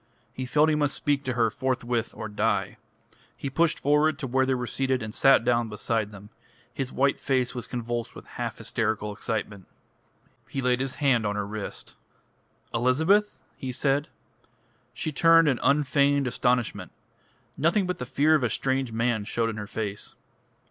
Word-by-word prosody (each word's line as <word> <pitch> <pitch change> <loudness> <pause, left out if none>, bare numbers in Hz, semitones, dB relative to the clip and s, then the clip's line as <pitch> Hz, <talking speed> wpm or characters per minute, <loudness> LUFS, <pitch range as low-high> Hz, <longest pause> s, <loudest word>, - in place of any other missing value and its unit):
He 130 0 -5
felt 150 +4 +4
he 155 - +3
must 145 -2 +1
speak 145 -1 0
to 130 - -1
her 115 -2 +2
forthwith, 120 -2 -1
or 110 - -5
die. 105 - -1 0.6
He 135 - -4
pushed 165 +3 +2
forward 150 +1 +3
to 140 - -4
where 130 +1 +1
they 130 - +2
were 125 -1 -3
seated, 130 -1 -1
and 110 -1 -6
sat 135 -2 +5
down 120 -2 +2
beside 105 0 -1
them. 105 +1 -12 0.4
His 135 0 -3
white 135 +1 +1
face 130 -3 0
was 125 -2 -5
convulsed 120 -1 -4
with - - -11
half - - -5
hysterical 105 -1 -2
excitement. 105 -3 -4 0.8
He 135 - -4
laid 125 -1 +1
his 135 -1 -2
hand 135 -6 +2
on 105 - -2
her 105 -1 -2
wrist. 105 0 -6 0.8
"Elizabeth?" 160 - +2 0.2
he 130 - -5
said. 140 +3 0 0.8
She 155 - -4
turned 165 +2 +5
in 130 -4 +2
unfeigned 140 0 +3
astonishment. 125 -2 0 0.6
Nothing 170 +6 +2
but 180 0 -3
the 125 - -4
fear 150 +5 +3
of 155 - +4
a 120 - +2
strange 130 +1 -1
man 115 -1 0
showed 115 +2 -1
in 110 - -8
her 105 -1 -5
face. 105 -2 -4
125 Hz, 170 wpm, -26 LUFS, 115-140 Hz, 0.8 s, sat